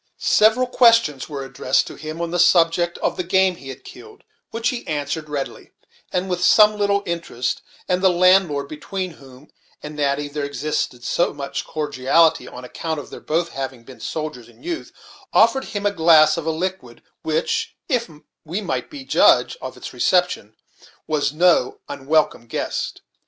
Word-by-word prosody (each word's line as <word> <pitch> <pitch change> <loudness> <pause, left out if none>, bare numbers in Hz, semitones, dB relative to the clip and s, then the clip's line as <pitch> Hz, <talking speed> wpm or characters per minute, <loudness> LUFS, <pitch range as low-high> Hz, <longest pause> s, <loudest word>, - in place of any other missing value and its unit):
Several 220 +4 +5
questions 230 - +3
were 140 -2 -5
addressed 130 -1 0
to - - -9
him, 155 +2 -7
on 170 -1 -3
the 175 - -1
subject 170 0 +3
of - - 0
the 180 - -1
game 190 0 +2
he 135 - -11
had 130 0 -9
killed, 430 -1 -13 0.3
which 230 +1 -1
he 250 -3 -5
answered 150 0 -3
readily, 140 -2 -5 0.4
and 185 +1 -1
with 180 -1 -2
some 210 +1 +6
little 200 -1 +1
interest; 170 -8 -3 0.3
and 180 0 +1
the 190 - +5
landlord, 180 -5 +3
between 185 +5 -5
whom 135 -1 -16 0.3
and 150 0 -7
Natty 145 0 0
there 145 0 -4
existed 140 -3 -3 0.3
much 140 -1 -4
cordiality, 150 -1 +2
on 125 0 -9
account 160 +4 -4
of 140 - -10
their - - -9
both 165 +2 -1
having 135 -3 -6
been 130 +1 -14
soldiers 150 -7 -5
in - - -21
youth, 335 -1 -5 0.4
offered 230 +4 +4
him 205 0 -5
a 205 - +3
glass 160 -4 +5
of 165 -1 -5
a - - +2
liquid 160 -7 -4 0.2
which, 155 -1 -1
if 245 - 0 0.3
we 170 +6 -3
might 200 - -3 0.2
judge - - +4
from - - -7
its - - -9
reception, 180 - +1 0.5
was 150 -2 0
no 165 -4 +3
unwelcome 145 -3 0
guest. - - -4
160 Hz, 165 wpm, -21 LUFS, 145-185 Hz, 0.5 s, some